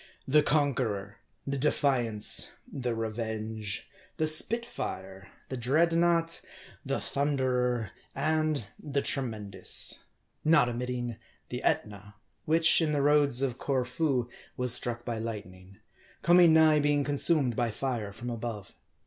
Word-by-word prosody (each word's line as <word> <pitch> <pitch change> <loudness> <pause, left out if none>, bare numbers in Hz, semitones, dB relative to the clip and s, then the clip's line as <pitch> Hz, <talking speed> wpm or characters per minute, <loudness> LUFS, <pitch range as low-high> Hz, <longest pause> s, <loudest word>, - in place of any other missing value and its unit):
The 150 +3 +4
Conqueror, 125 -10 -1 0.3
the 140 0 -3
Defiance, 130 -7 +3 0.2
the 125 -3 -4
Revenge, 110 -2 -5 0.3
the 155 - +1
Spitfire, 155 - +2 0.2
the 130 - -5
Dreadnaught, 165 +5 +1 0.4
the - - -1
Thunderer, 125 -5 -1 0.2
and 155 -2 0
the 140 -1 -3
Tremendous; 110 -7 +1 0.4
not 155 -5 +4
omitting 120 -1 -4 0.3
the - - -5
Etna, 105 0 -3 0.3
which, 165 +2 +4
in 155 -2 0
the 145 - 0
Roads 145 -3 +3
of 125 -3 -3
Corfu, 130 -1 -1 0.3
was 125 -2 +3
struck 120 -1 -2
by 115 -2 -4
light 110 -2 -5
ning, 95 +1 -17 0.5
coming 175 0 +6
nigh 160 -1 +5
being 145 0 +1
consumed 140 -3 +3
by 120 0 -1
fire 115 -2 -4
from 120 +4 -7
above. 115 -3 -6
125 Hz, 120 wpm, -28 LUFS, 115-150 Hz, 0.5 s, coming